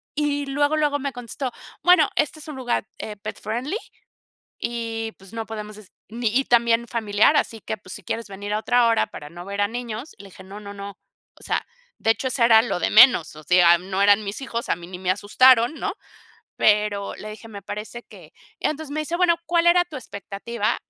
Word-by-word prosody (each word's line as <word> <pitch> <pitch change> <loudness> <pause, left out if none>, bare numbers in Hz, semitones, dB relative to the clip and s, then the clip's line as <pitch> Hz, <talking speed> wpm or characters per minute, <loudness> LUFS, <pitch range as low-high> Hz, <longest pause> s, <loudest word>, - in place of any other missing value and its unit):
y 290 -1 0
luego, 290 +3 +1
luego 295 -1 +1
me 280 0 -3
contestó, 245 +2 -5 0.3
bueno, 355 -5 +6
este 305 +1 0
es 305 - -7
un 305 - -7
lugar, 245 -4 -1
eh, 215 - -6
pet 210 +2 -7
friendly, 250 - -3 0.8
y 225 -1 -3
pues 195 +1 -16
no 225 -1 -5
podemos 215 -1 -7
es 210 -3 -16 0.2
ni 230 +1 -1
y 270 - +1
también 235 -1 +3
familiar, 220 +4 +2
así 225 -5 0
que - - -4
pues 185 -1 -12
si 210 - -10
quieres 225 +5 -4
venir 200 +1 -6
a - - +1
otra 245 +1 +3
hora 230 -1 +2
para 150 0 -10
no 175 +1 -9
ver 200 +1 -2
a 205 - +2
niños, 240 +3 -6
le 200 - -12
dije 190 +1 -14
no 200 +2 -10
no 200 -1 -9
no, 200 0 -7 0.5
o - - -15
sea, - - -1 0.3
de 225 - +1
hecho 245 +4 -3
eso 255 -2 +1
era 225 -1 +7
lo 230 - -2
de - - +1
menos, 220 - +6
o 155 - -11
sea, 175 0 +6
no 190 +2 -4
eran 205 +1 +5
mis 200 +4 -5
hijos, 235 -3 -4
a - - +1
mí 175 -1 -11
ni 180 -1 -8
me 185 0 -1
asustaron, 235 +6 +4
¿no? 400 +5 -3 0.6
Pero 210 -1 +2
le 215 - -8
dije, 220 +2 -11
me 200 -2 -9
parece 210 +4 -7
que - - -15 0.3
entonces, 310 -1 -2
me 310 - -1
dice: 310 +3 -2
"Bueno, 350 -1 +3
¿cuál 340 0 +2
era 355 +1 +6
tu 320 -5 -9
expectativa?" 210 -1 -3
225 Hz, 220 wpm, -23 LUFS, 205-265 Hz, 0.8 s, era